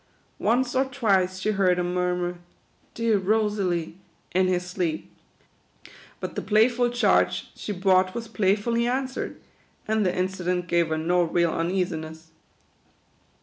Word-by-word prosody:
Once 245 +3 +1
or 265 +1 +2
twice 200 -8 +1
she 200 +3 0
heard 190 -3 +2
him 175 0 -1
murmur, 180 -1 -1 0.3
" - - -38
dear 230 -3 +2
Rosalie," 190 -4 0 0.3
in 185 +1 +3
his 180 -1 0
sleep; 180 -3 -3 1.1
but - - -5
the - - -3
playful 240 +3 +3
charge 245 0 +1
she - - -6
brought 185 -1 +2
was 235 -1 -4
play 200 -3 +2
fully 235 +3 0
answered, 260 +1 -3 0.5
and 220 0 +1
the 180 -2 0
incident 180 -1 -1
gave 170 -1 +2
her 160 - -1
o 175 +3 +2
real 170 0 +1
un 165 +1 -1
easiness. 160 -3 -3
185 Hz, 145 wpm, -25 LUFS, 180-220 Hz, 1.1 s, in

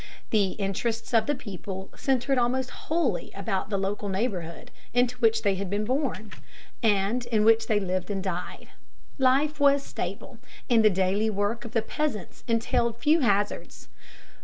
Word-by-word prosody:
The 200 -4 +2
interests 220 +4 -3
of 225 -1 +4
the 290 - +1
people 195 -5 -7
centered 265 0 +1
almost 250 +1 0
wholly 305 - -1
about 195 0 -2
the 200 - 0
local 200 +1 -2
neighborhood 190 -5 -3 0.2
into 245 0 +3
which 225 -2 +3
they 200 -2 +3
had 190 0 -4
been 205 +2 -1
born, 250 -4 -2 0.5
and 215 +2 +2
in 215 -3 +2
which 225 0 +5
they 215 -2 +2
lived 185 -1 -2
and 195 -2 -2
died. 180 -2 -5 0.5
Life 280 +3 +3
was 280 -1 +4
stable, - - -6 0.3
and 230 -3 +4
the 215 - +7
daily 195 +3 +1
work 210 +3 -1
of 230 - -8
the 225 - +1
peasants 290 -3 -3
entailed 230 0 +1
few 305 +6 +3
hazards. 205 -5 -1
220 Hz, 160 wpm, -27 LUFS, 195-250 Hz, 0.5 s, the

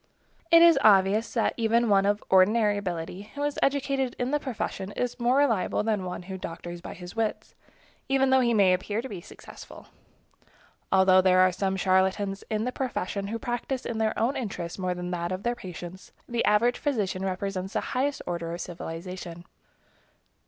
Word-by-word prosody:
It 335 0 +8
is 340 -1 +7
obvious 205 +2 +4
that 230 - +1
one 225 -3 +3
of 205 0 +2
even - - -23
ordinary 205 +3 +4
ability, 180 +1 -5
who 285 - -3
is 290 0 -1
educated 275 -2 0
in 250 +1 -2
the 295 - +1
profession, 215 -7 -4
is 245 0 -3
more 245 +2 +2
reliable 230 -9 +2
than 210 -4 -1
one 180 0 -5
who 190 +1 -7
doctors 175 0 -7
by - - -8
his 180 +2 -10
wits, 225 -1 -2 0.6
even 270 -1 +3
though 265 - +6
he 240 -2 +2
may 200 -5 +4
appear 205 +5 -2
to - - -5
be 195 -7 -7
successful. 190 - -13 1.0
Although 190 0 +6
there 185 0 +4
are 185 0 +5
some 190 +1 -1
charlatans 190 +1 +1
in 215 -1 -1
the 250 - -1
profession, 200 -7 -3
who 225 +3 -3
practice 245 +2 -3
in 225 -1 -3
their 220 0 0
own 240 +5 +1
interest 195 -8 -5
more 180 -1 -1
than 180 0 -5
in 180 - -4
that 175 0 -3
of 185 +1 -4
their 240 - +1
patients, 180 -1 -9 0.2
the 235 -1 -1
average 225 +4 +3
physician 210 -10 -1
represents 190 0 -3
the - - 0
highest 275 +3 -1
order 170 -1 -3
of - - -9
civilization. 175 0 -7
200 Hz, 185 wpm, -27 LUFS, 185-240 Hz, 1.0 s, It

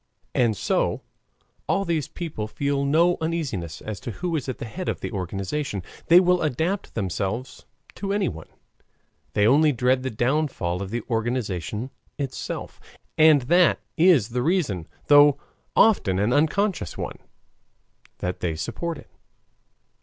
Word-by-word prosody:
And 115 -4 +2
so - - 0 0.7
all 195 0 +1
these 165 -5 -1
people 155 -11 -5
feel 140 +4 -1
no 170 +5 +3
uneasiness 145 - -3
as 110 -3 -5
to - - -7
who 170 - -3
is 140 -4 -3
at 130 - -4
the - - -6
head 180 +11 -5
of - - -3
the - - -4
organization, 100 - -3 0.2
they 170 +2 +8
will 180 -1 +3
adapt 160 +7 -1
themselves 100 +5 -3 0.3
to 195 -1 -4
anyone; 190 - -2 0.9
they 105 - +3
only 150 +6 +5
dread 130 0 +2
the 130 - -2
downfall 120 - -1
of 100 - -4
the 115 +1 -3
organization 115 -1 -2 0.3
itself, 135 -3 -5 0.4
and 155 -4 +6
that 175 +7 +4 0.2
is 160 - +4
the 125 +1 -1
reason 140 - 0 0.2
though 145 -1 +7 0.4
often 145 - +4
an 105 +5 +1
unconscious 160 - +1
one - - -5 1.0
that 90 0 -3
they 85 -3 -2
support 160 - -4
it. - - -15
130 Hz, 140 wpm, -24 LUFS, 105-160 Hz, 1.0 s, they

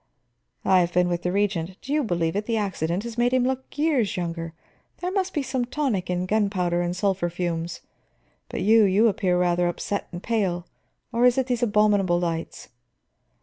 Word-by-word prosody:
"I 190 -1 +5
have 175 -1 +1
been 180 0 +3
with 175 -1 -1
the 180 - -1
Regent. 190 -3 -1
Do 275 - -5
you 300 -1 +2
believe 170 -6 -1
it, 210 +1 -2
the 230 -1 0
accident 185 -3 -1
has 235 0 -6
made 245 +1 +3
him 255 -1 +3
look 260 +2 -3
years 285 - +1
younger. 165 -2 -4 0.4
There 360 +1 -3
must 380 -1 0
be 295 - -1
some 260 -1 -1
tonic 240 -8 -2
in 180 0 -1
gunpowder 185 -4 +1
and 175 0 -2
sulphur 190 -2 0
fumes. 170 -1 -3 0.7
But - - -4
you, 220 +2 +5
you 200 +4 +4
appear 185 -4 +1
rather 175 0 +2
upset 200 +3 -3
and 175 0 -7
pale; 190 -7 -1 0.5
or 235 +1 +3
is 245 - +3
it 265 - +2
these 245 -2 -1
abominable 205 -5 +3
lights?" 165 -2 -4
195 Hz, 190 wpm, -25 LUFS, 175-235 Hz, 0.7 s, I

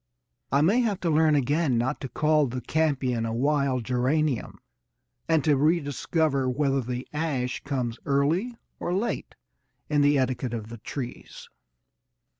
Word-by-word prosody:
I 140 - +3
may 195 +11 +4
have 215 -6 0
to 170 - +1
learn 155 0 +4
again 145 0 +1
not 130 +5 -1
to 135 - -5
call 150 +2 +2
the 125 +1 -4
campion 130 -4 0
a 115 - -2
wild 135 0 +1
geranium, 130 +3 0 0.7
and 160 -3 +3
to 150 -2 +4
rediscover 145 -2 +1
whether 135 +1 +1
the 125 +1 -5
ash 140 -6 -2
comes 125 -5 -3
early 160 - +1 0.2
or 175 - -2
late 225 +5 -2 0.6
in 145 -1 +3
the 145 0 +4
etiquette 130 -2 -1
of 110 -1 -6
the 115 -1 -9
trees. 125 +3 -7
140 Hz, 145 wpm, -26 LUFS, 125-155 Hz, 0.7 s, may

